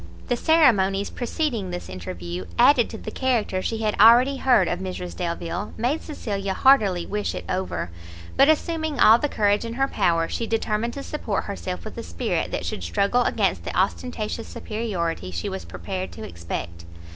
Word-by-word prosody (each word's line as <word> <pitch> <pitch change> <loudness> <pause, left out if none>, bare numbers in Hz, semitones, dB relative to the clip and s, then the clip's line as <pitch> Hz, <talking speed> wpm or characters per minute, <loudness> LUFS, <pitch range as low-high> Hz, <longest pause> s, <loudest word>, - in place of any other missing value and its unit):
The 245 - +3
ceremonies 215 - +3
preceding 245 - -2
this 175 0 -5
interview, 90 -1 -6
added 255 -5 +5
to 220 - -7
the 215 - -7
character 235 -8 0
she 225 +3 -2
had 210 -1 +1
already 245 +5 +7
heard 245 -9 +4
of 175 - -1
Mrs 185 -1 -5
Delvile, 170 +3 -4
made 250 +8 0
Cecilia 200 -10 -4
heartily 205 -10 +4
wish 210 0 -2
it - - -6
over; 185 - -3 0.4
but, 275 - +6
assuming 315 -2 0
all 225 +1 +7
the 295 - -1
courage 205 -2 +2
in 230 0 -5
her 270 +3 +1
power, 170 -8 +1
she 230 - -3
determined 225 +1 -1
to 280 - -5
support 225 -10 -3
herself 85 -1 -5
with - - -7
a - - -5
spirit 85 0 -2
that - - -3
should - - -4
struggle 200 - +1
against - - +1
the - - -4
ostentatious 230 -2 -1
superiority 185 - -3
she 85 -2 -4
was 95 -3 -6
prepared 90 +1 -5
to - - -9
expect. 85 -1 -6
205 Hz, 175 wpm, -24 LUFS, 170-245 Hz, 0.4 s, already